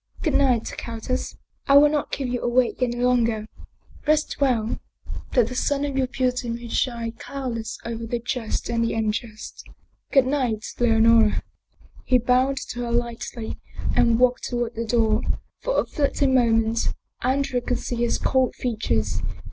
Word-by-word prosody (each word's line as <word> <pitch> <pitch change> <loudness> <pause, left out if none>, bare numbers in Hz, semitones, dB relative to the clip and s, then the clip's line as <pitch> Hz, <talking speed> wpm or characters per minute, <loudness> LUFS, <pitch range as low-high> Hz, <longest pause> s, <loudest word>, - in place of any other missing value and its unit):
Good 310 - +1
night, 255 -5 +2
countess. 230 +2 -4 0.3
I 275 - +7
will 295 +1 +8
not 295 -2 -1
keep 270 -2 -2
you 245 -1 -2
awake 245 +1 +1
any 240 -1 +1
longer. 235 -3 +2 0.6
Rest 305 -1 +1
well, 235 -5 +1 0.5
that 245 -4 +4
the 255 - -5
sun 285 +2 0
of 280 -2 -3
your 265 -1 +1
beauty 250 -1 -1
may 235 0 -5
shine 235 -1 -1
cloudless 230 -2 -5
over 230 0 -4
the 240 - -1
just 240 -1 -3
and 230 -1 0
the 230 - -1
unjust. 220 0 -3 0.5
Good 270 -2 +5
night, 255 -6 0
Leonora! 225 -2 +4 0.3
" - - -25
He 255 - +5
bowed 255 +3 +2
to 240 - -7
her 240 -1 -3
lightly 235 -1 -3 0.4
and 230 -1 +4
walked 250 0 +3
toward 240 -1 -2
the 230 0 -3
door. 220 -1 +2 0.4
For - - 0
a - - +1
fleeting 280 -2 +1
moment 225 -2 +2 0.3
Andrea 260 0 0
could 250 +1 -1
see 245 - -4
his 235 0 +1
cold 260 -1 +1
features. 230 -3 -1
240 Hz, 160 wpm, -24 LUFS, 230-260 Hz, 0.6 s, will